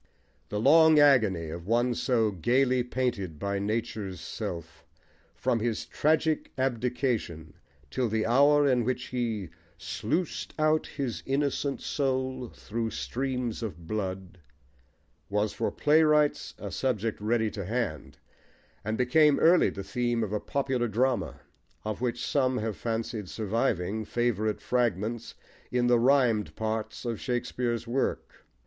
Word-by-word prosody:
The 105 - -2
long 160 +6 +6
agony 110 - +4
of 85 +2 -7
one 120 +2 +2
so 115 -3 +1
gaily 125 +8 +2
painted 120 -9 -2
by 100 +5 -2
nature's 100 -3 -3
self, 85 -3 -6 0.5
from 115 - 0
his 115 0 -2
"tragic 155 +1 +1
abdication" 120 - -1 0.4
till 125 - 0
the 110 0 0
hour 145 +4 +5
in 125 -3 +3
which 125 +1 -2
he 115 -7 -2 0.3
Sluiced 105 - -3
out 155 0 +2
his 135 -5 -4
innocent 140 0 0
soul 130 -3 -1
thro' 115 +1 -4
streams 125 -1 -3
of 85 -7 -6
blood, 95 -2 -4 0.9
was 105 +1 0
for 115 +2 -1
playwrights 150 -1 +3
a - - -6
subject 115 -5 -1
ready 110 0 +1
to 100 - -5
hand, 110 - -3 0.7
and 110 +2 -2
became 145 +4 +4
early 170 +2 +5
the 100 - -6
theme 120 +3 -1
of 105 -1 -3
a 105 - 0
popular 130 -2 -1
drama, 120 0 0 0.4
of 110 +1 -3
which 120 -1 -1
some 130 -3 +1
have 110 -3 -2
fancied 115 -3 -3
surviving 110 -2 -1
favourite 110 -2 -1
fragments 115 -2 -1 0.4
in 125 0 +2
the 120 -1 +4
rhymed 120 -4 +3
parts 110 +2 -3
of 115 -3 -3
Shakespeare's 120 -1 -2
work. 130 +3 -3
120 Hz, 130 wpm, -28 LUFS, 105-130 Hz, 0.9 s, long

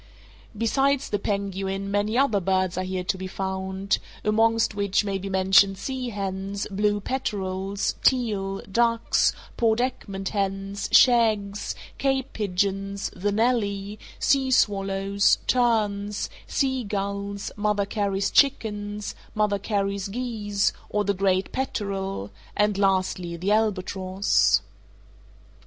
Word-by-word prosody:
Besides 270 +5 +1
the 205 - 0
penguin 195 -1 -2
many 205 +3 +1
other 265 -7 +3
birds 185 -1 0
are 185 - -1
here 185 0 -3
to 190 +1 -1
be 190 - -4
found, 190 +1 -2 0.2
among 225 +2 +3
which 200 0 +1
may 195 -1 -1
be 195 +1 -5
mentioned 190 +1 +4
sea 255 +3 -4
hens, 195 -1 -3
blue 205 +1 +1
peterels, 195 -5 -2
teal, 205 -7 +1
ducks, 230 +3 +2 0.3
Port 225 -1 +2
Egmont 200 -6 -2
hens, 195 0 -2
shags, 215 -5 +4 0.2
Cape 270 -1 0
pigeons, 195 0 -1
the 205 +3 -1
nelly, 205 -2 0 0.2
sea 270 -1 +2
swallows, 195 -3 +2
terns, 210 -4 +1 0.2
sea 265 -2 0
gulls, 200 -1 -3
Mother 210 -1 +1
Carey's 200 -1 -1
chickens, 210 -6 +1 0.2
Mother 210 -1 +1
Carey's 200 -1 -1
geese, 210 -3 -1 0.2
or 210 - 0
the 200 - +2
great 190 0 +1
peterel, 195 - -3 0.3
and, 210 0 +3
lastly, 185 -3 0
the 185 +4 -1
albatross. 190 - +2
200 Hz, 115 wpm, -25 LUFS, 195-215 Hz, 0.3 s, mentioned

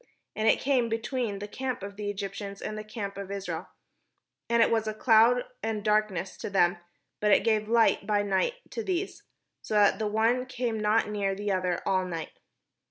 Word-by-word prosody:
And 215 +1 0
it - - +5
came 260 -4 +1
between 225 -1 -2
the 205 +1 -6
camp 255 0 -4
of 200 0 -7
the 205 0 -3
Eg}'ptians 200 0 -6
and 215 - -5
the 215 - -5
camp 210 -2 -6
of 195 -1 -6
Israel; 200 -1 -4 0.8
and 235 0 +5
it - - +1
was 225 -1 +1
a 215 - -2
cloud 230 +2 +5 0.2
and 220 -1 -2
darkness 210 -4 0
to - - -5
them, 180 -3 +3 0.4
but 210 - +1
it 200 - +5
gave 215 -2 +1
Hght 225 -3 +3
by 205 -1 +2
night 200 - +1 0.2
to 455 - -4
these; 375 0 -2 0.4
so 215 - -4
that 205 +1 +4
the 215 - 0
one 230 +4 +1
came 240 -3 -2
not 210 +1 +2
near 200 -2 -1
the 205 +1 -2
other 180 -2 -1
all 190 -1 +2
the 185 - -6
night. 165 -2 -5
210 Hz, 200 wpm, -28 LUFS, 200-230 Hz, 0.8 s, it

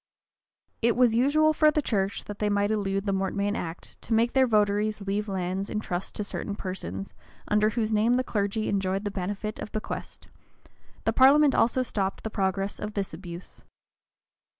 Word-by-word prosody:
[] - - -68 0.3
It 235 0 +3
was 245 -2 +4
usual 295 +6 +4
for 305 0 +5
the 300 - +1
church, 200 -3 -1
that 205 0 -8
they 210 - +1
might 205 0 +1
elude 195 -2 -1
the 200 - 0
mortmain 200 +2 -1
act, 165 +1 -7
to 225 - -1
make 230 +2 +2
their 265 -1 +4
votaries 210 -1 +1
leave 200 +2 -2
lands 190 +1 -2
in 210 - -2
trust 180 -3 -4
to 210 - -2
certain 200 0 -4
persons, 100 - -5 0.4
under 210 +1 +3
whose 220 -1 -1
name 220 +3 +3
the 255 +1 +2
clergy 210 -1 -1
enjoyed 195 0 -1
the 205 - -1
benefit 200 +3 -4
of - - -6
the 215 - 0
bequest: - - -7 0.8
the - - +1
parliament 280 +2 +6
also 245 +3 +2
stopped 195 -5 -2
the 220 - -4
progress 195 0 -1
of 210 0 -5
this 195 -4 -2
abuse. 175 +1 -9
205 Hz, 185 wpm, -27 LUFS, 195-225 Hz, 0.8 s, parliament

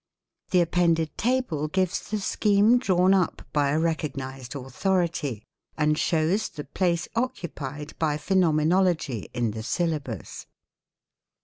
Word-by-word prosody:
The 180 - +4
appended 165 -2 +1
table 230 - 0
gives 185 +2 -1
the 215 0 -1
scheme 210 +4 +3
drawn 185 -5 +3
up 185 -3 +1
by 145 -2 +2
a 145 - +1
recognised 135 -6 -3
authority, 145 - -1 0.3
and 150 -1 +2
shows 170 +7 +1
the 150 - -7
place 170 +4 -1
occupied 155 - -4
by 150 -2 +1
Phenomenology 165 - +1
in 120 -3 -1
the 110 +1 -6
syllabus. 140 - -3
165 Hz, 115 wpm, -26 LUFS, 145-185 Hz, 0.3 s, The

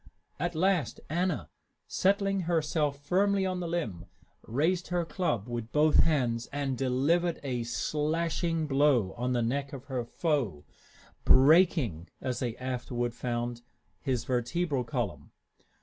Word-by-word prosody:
At 175 +2 -2
last 180 -1 +1
Anna, 180 +3 0 0.4
settling 195 0 +2
herself 150 -3 +1
firmly 195 +3 +2
on 185 -1 -1
the 175 - -3
limb, 150 - -3 0.3
raised 165 +9 0
her 175 -1 0
club 125 - -1
with 120 -1 -5
both 150 +1 +4
hands 125 -7 +2
and 140 -2 -1
delivered 140 +7 +1
a 125 -3 -2
slashing 160 +5 -1
blow 135 -8 +3
on 125 +1 -1
the 120 -1 +1
neck 140 +4 -2
of 135 -1 -8
her 130 -3 -2
foe, 115 - -1 0.6
breaking, 135 - +4
as 125 -1 -3
they 120 -3 -3
afterward 125 -2 -3
found, 120 -1 -3 0.4
his 130 -5 -1
vertebral 130 +3 0
column. 120 -6 -4
140 Hz, 130 wpm, -29 LUFS, 120-170 Hz, 0.6 s, both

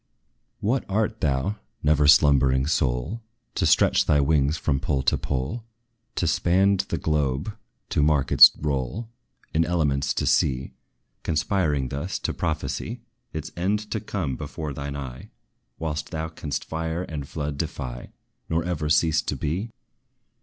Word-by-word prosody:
What 120 +5 +1
art 110 +2 0
thou, 70 +8 0 0.3
never 75 -1 +4
slumbering 70 -3 +5
soul, 70 - 0 0.3
To - - +1
stretch - - +4
thy 75 - +4
wings 70 +1 +2
from 70 -3 0
pole 65 -1 -1
to - - +3
pole 70 - -3 0.5
To - - 0
span 95 +4 +3
the 90 -2 -2
globe 75 +5 -1 0.3
to - - +1
mark 75 -2 +2
its - - +11
roll 75 - -2 0.4
Its 80 0 +2
elements 70 -5 +1
to - - 0
see, 65 0 +1 0.5
Conspiring 75 -4 0
thus, 70 +9 -3
to - - -3
prophesy 80 - -3 0.3
Its 80 -1 -5
end 105 +4 -1
to 110 - 0
come 85 -11 -3
before 75 +1 -5
thine 70 +1 -5
eye, 65 -3 -7 0.5
Whilst 75 -2 -3
thou 80 0 -3
canst 75 -3 -4
fire 80 +2 -3
and 75 -5 -6
flood 75 -2 -4
defy, 65 -6 -5 0.4
Nor 80 0 +1
ever 80 -4 -2
cease 80 +1 +3
to - - -3
be? 90 +10 -2
75 Hz, 145 wpm, -25 LUFS, 70-85 Hz, 0.5 s, its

